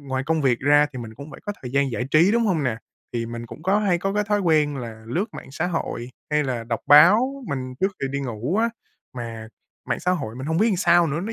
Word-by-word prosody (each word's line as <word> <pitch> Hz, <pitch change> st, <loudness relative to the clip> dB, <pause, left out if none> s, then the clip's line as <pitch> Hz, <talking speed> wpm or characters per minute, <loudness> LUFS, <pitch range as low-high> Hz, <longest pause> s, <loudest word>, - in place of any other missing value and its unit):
ngoài 130 Hz, -1 st, -3 dB
công 160 Hz, -1 st, +1 dB
việc 125 Hz, -3 st, +2 dB
ra 145 Hz, +2 st, +5 dB
thì 130 Hz, -, -6 dB
mình 110 Hz, -2 st, -8 dB
cũng 140 Hz, +5 st, -10 dB
phải -, -, -11 dB
có 205 Hz, -, -1 dB
thời 125 Hz, -, -6 dB
gian 140 Hz, -1 st, +2 dB
giải 115 Hz, +1 st, -2 dB
trí, 170 Hz, +7 st, +5 dB
đúng 235 Hz, 0 st, +2 dB
hông 170 Hz, -6 st, +1 dB
nè? 120 Hz, -5 st, 0 dB, 0.4 s
Thì 115 Hz, -1 st, -2 dB
mình 115 Hz, 0 st, -6 dB
cũng 125 Hz, +7 st, -11 dB
có 195 Hz, +3 st, +2 dB
hay 190 Hz, -5 st, +1 dB
có 195 Hz, +2 st, -2 dB
cái 210 Hz, -, +1 dB
thói 205 Hz, 0 st, +1 dB
quen 155 Hz, -5 st, +2 dB
là 115 Hz, -3 st, -7 dB
lướt 175 Hz, -, -1 dB
mạng -, -, -9 dB
xã 160 Hz, +4 st, -1 dB
hội 130 Hz, -8 st, -3 dB, 0.2 s
hay 150 Hz, 0 st, +2 dB
là 125 Hz, -4 st, -3 dB
đọc 115 Hz, -2 st, -3 dB
báo, 230 Hz, -, +6 dB
mình 130 Hz, -2 st, -4 dB
trước 195 Hz, +1 st, +1 dB
khi 135 Hz, -, 0 dB
đi 140 Hz, +1 st, -2 dB
ngủ 125 Hz, -, -3 dB
á. 230 Hz, +1 st, +2 dB, 0.4 s
Mà 115 Hz, -2 st, -6 dB, 0.4 s
mạng -, -, -1 dB
xã 180 Hz, -, 0 dB
hội 115 Hz, -11 st, -2 dB
mình 130 Hz, +2 st, -6 dB
hông 160 Hz, +1 st, 0 dB
biết 220 Hz, +4 st, +4 dB
làm 200 Hz, -, +1 dB
sao 175 Hz, -1 st, +4 dB
nữa, 155 Hz, +3 st, -2 dB
nó, 220 Hz, +4 st, -4 dB
145 Hz, 270 wpm, -23 LUFS, 125-185 Hz, 0.4 s, báo